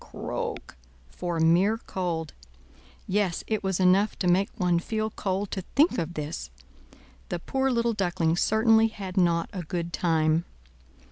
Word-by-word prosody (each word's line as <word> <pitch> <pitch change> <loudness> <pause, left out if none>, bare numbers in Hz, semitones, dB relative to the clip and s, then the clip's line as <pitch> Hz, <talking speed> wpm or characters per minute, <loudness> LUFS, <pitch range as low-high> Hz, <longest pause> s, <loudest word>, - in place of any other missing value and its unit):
croak!" - - -5 0.4
for 175 -2 -3
mere 175 +7 +4
cold; 170 -7 -4 0.7
yes, 190 -3 0
it 215 -1 -2
was 190 -1 -1
enough 190 +3 +3
to 180 - -1
make 185 +3 +3
one 180 -4 +2
feel 215 +4 -2
cold 195 -1 -2
to 190 - -3
think 295 - +4
of 170 0 -4
this. 150 - -5 0.8
The 175 - -2
poor 265 +9 -1
little 235 -2 +1
Duckling 175 -5 0
certainly 220 +4 +4
had 195 -4 -7
not 170 -2 +2
a 185 - -4
good 170 +1 -4
time. 160 -1 +1
185 Hz, 145 wpm, -27 LUFS, 170-215 Hz, 0.8 s, mere